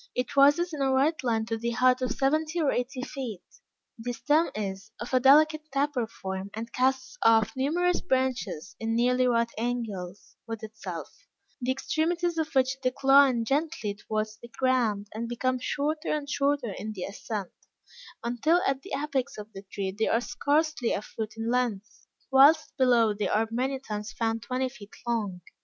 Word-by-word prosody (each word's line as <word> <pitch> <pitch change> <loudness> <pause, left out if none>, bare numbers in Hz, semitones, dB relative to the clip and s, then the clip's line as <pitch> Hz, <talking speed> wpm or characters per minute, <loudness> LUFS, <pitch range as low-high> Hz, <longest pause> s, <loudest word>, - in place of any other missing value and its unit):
It 250 +1 -2
rises 290 +5 +5
in 295 - -4
a 270 -1 +2
right 280 +4 +2
line 225 -3 +1
to 225 0 -3
the 235 +1 -1
height 255 0 +4
of 255 -2 0
seventy 310 +6 0
or 300 -4 +2
eighty 250 +1 -2
feet; 250 -9 -6 0.6
the 245 +2 -3
stem 300 +6 +2
is 200 0 -5
of 235 +4 -6
a 255 - +5
delicate 310 +3 +5
taper 275 -4 0
form 190 -2 -6
and 230 +1 -6
casts 260 0 0
off 225 -1 +4
numerous 345 +7 +1
branches, 255 -11 -1
in 225 0 -1
nearly 250 +2 +3
right 235 -1 +2
angles 215 -6 -4
with 225 -1 -6
itself; 205 -6 -8 0.3
the 250 - -2
extremities 335 +5 0
of 315 -1 -1
which 260 +1 +3
decline 265 -2 +4
gently 270 -6 -1
towards 215 +1 -3
the 235 - -11
ground, 235 -5 +1
and 230 +2 -4
become 255 +1 -1
shorter 300 +4 -2
and 295 -2 -2
shorter 280 -6 0
in 215 +1 -5
the 185 -3 -5
ascent, 200 -1 -5 0.7
until 245 +9 +2
at 270 -4 0
the - - -9
apex 280 -3 -2
of 210 +1 -9
the 195 - -8
tree 195 -2 -2
they 220 +1 0
are 230 - +3
scarcely 300 0 0
a - - -1
foot 220 0 -6
in 225 +1 -2
length, 245 -1 -2 0.2
whilst 290 +4 +6
below 240 -5 +4
they 205 -1 -2
are 220 +4 +1
many 260 +3 -1
times 210 -4 -5
found 225 0 -1
twenty 255 +3 -1
feet 215 -6 -12
long. 210 -6 -2
250 Hz, 175 wpm, -28 LUFS, 220-275 Hz, 0.7 s, whilst